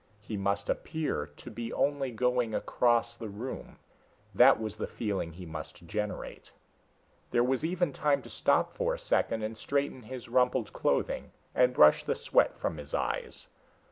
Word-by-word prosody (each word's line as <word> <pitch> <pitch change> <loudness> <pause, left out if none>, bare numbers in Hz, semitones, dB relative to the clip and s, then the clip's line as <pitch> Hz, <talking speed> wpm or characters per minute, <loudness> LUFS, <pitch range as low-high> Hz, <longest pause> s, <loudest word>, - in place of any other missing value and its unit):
He 110 - -6
must 100 0 -1
appear 155 - -2
to 75 +10 -12
be 115 +1 -5
only 140 -2 0
going 125 -1 +1
across 120 -1 +2
the 115 -2 -7
room, 110 +6 -7 0.6
that - - +7
was 110 -1 -4
the 110 - -3
feeling 100 -7 -3
he 90 +2 -9
must 80 +2 -8
generate. 105 +4 -4 0.8
There 120 - +3
was 130 +3 +1
even 170 -2 0
time 145 0 +1
to - - -11
stop - - +2
for - - 0
a - - -9
second 110 -1 +1
and 110 +1 -3
straighten 140 +2 -1
his 125 +2 -8
rumpled 125 +1 +2
clothing - - 0 0.2
and 125 0 +4
brush 75 -11 +6
the - - 0
sweat - - +2
from 80 - -2
his 75 0 -5
eyes. - - -3
115 Hz, 165 wpm, -30 LUFS, 100-130 Hz, 0.8 s, that